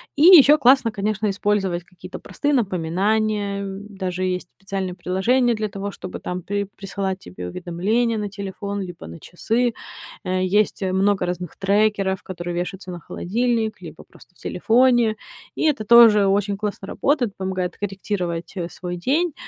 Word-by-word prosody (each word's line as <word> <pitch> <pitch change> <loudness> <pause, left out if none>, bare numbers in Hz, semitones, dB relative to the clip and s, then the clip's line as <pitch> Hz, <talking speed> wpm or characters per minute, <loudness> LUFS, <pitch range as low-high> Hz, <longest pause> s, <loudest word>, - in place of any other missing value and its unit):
И 290 - +2
ещё 305 -4 +9
классно, 255 -3 +4
конечно, 210 0 -1
использовать 195 -3 0
какие-то 180 +1 -11
простые 285 +10 -2
напоминания, 200 - 0
м. 195 +1 -6
Даже 185 -2 -4
есть 185 -1 -2
специальные 195 -1 -4
приложения 230 +8 +1
для 215 -1 -2
того, 200 +1 -5
чтобы 185 - -8
там 180 0 -4
при 200 +3 -2
присылать 195 -1 -5
тебе 90 - -8
уведомления 195 - -1
на 210 -1 -3
телефон 200 0 -5
либо 175 - -8
на 85 +1 -10
часы. 230 +7 -1 0.5
Э, 185 0 -1
есть 205 +3 +1
много 190 0 +1
разных 180 -1 -5
трекеров, 200 -1 +1
которые 175 -1 -5
вещаются 180 +1 -4
на 175 - -7
холодильник 225 +4 -1
либо - - -10
просто - - -20
в - - -26
телефоне. 240 -2 +2 0.4
И - - -1
это 290 -8 +1
тоже 225 -3 +7
очень 200 +1 +1
классно 200 -1 -4
работает. 250 -3 0
Помогает 185 -2 -3
корректировать, 185 -4 -4
э, 175 -3 -3
свой 180 0 -6
день, 285 - 0
200 Hz, 155 wpm, -22 LUFS, 185-215 Hz, 0.5 s, ещё